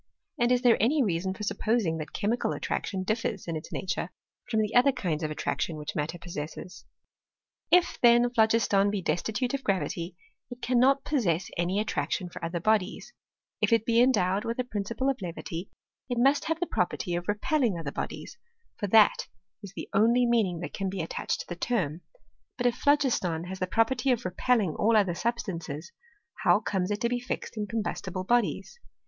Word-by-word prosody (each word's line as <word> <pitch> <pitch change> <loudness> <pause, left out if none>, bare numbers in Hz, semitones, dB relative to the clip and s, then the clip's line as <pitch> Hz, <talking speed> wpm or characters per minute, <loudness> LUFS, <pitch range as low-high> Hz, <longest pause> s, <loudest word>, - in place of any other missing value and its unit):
And 240 +1 +3
is 250 0 +2
there 240 -2 +5
any 275 +6 +3
reason 190 -1 -1
for 210 - -7
supposing 210 -5 0
that 155 0 -6
chemical 220 +3 -1
attraction 190 -2 -3
differs 215 -2 -2
m 165 - -2
its 155 - -7
nature 190 - -3 0.4
from 220 -2 +2
the 215 0 -2
other 250 +3 +6
kinds 175 - -2
of 155 - -1
attraction 155 +1 -2
which 150 0 -6
matter 155 +3 -2
possesses? 170 0 -7 0.8
If, 360 0 +4
then, 240 0 +6
phlogiston 220 -3 +3
be 200 -2 -2
destitute 220 +9 -1
of 275 -1 -2
gravity, 185 -3 -2 0.3
it 245 -1 -9
cannot 255 +3 +3
pbssesii 190 - 0
Any 175 +4 0
attraction 205 -3 -2
fot - - -10
other 170 +1 -2
bodies; 215 - 0 0.5
if - - +2
it 225 -1 +3
be 230 0 +4
endowed 205 -6 +3
with 230 0 -3
a 255 - 0
principle 230 +2 -3
of 270 -4 0
levity, 170 0 -5 0.4
it 245 - -1
must 275 +4 +3
have 325 0 -1
the 355 - 0
property 180 - -1
ot 175 +1 -4
repelling 225 - +1
other 155 -4 -4
bodies, - - -6 0.4
for 205 - -2
that 215 +1 +5 0.3
is 200 -3 -9
the - - -6
only 230 +5 +4
meaning 210 -8 +1
that 175 - -6
can 195 -1 -2
be 190 -1 -3
attached 165 - -3
tb - - -11
the 175 - -5
Ifeim 180 -10 -1 0.6
But 245 - -2
if 245 -1 +3
phlo^^tdii 240 - +2
has 190 0 -6
the 185 - -1
property 230 +6 +2
of 240 -4 0
repelling 195 -1 +1
all 225 +1 +3
other 195 -4 +3
substances, 170 -7 -4 0.5
how - - +5
comes 185 -2 -1
it 205 0 -2
to 235 - +2
be 245 0 0
fixed 245 - -5
in 210 -1 -3
combustible 205 -4 -3
bodies 240 - 0
210 Hz, 185 wpm, -28 LUFS, 180-240 Hz, 0.8 s, other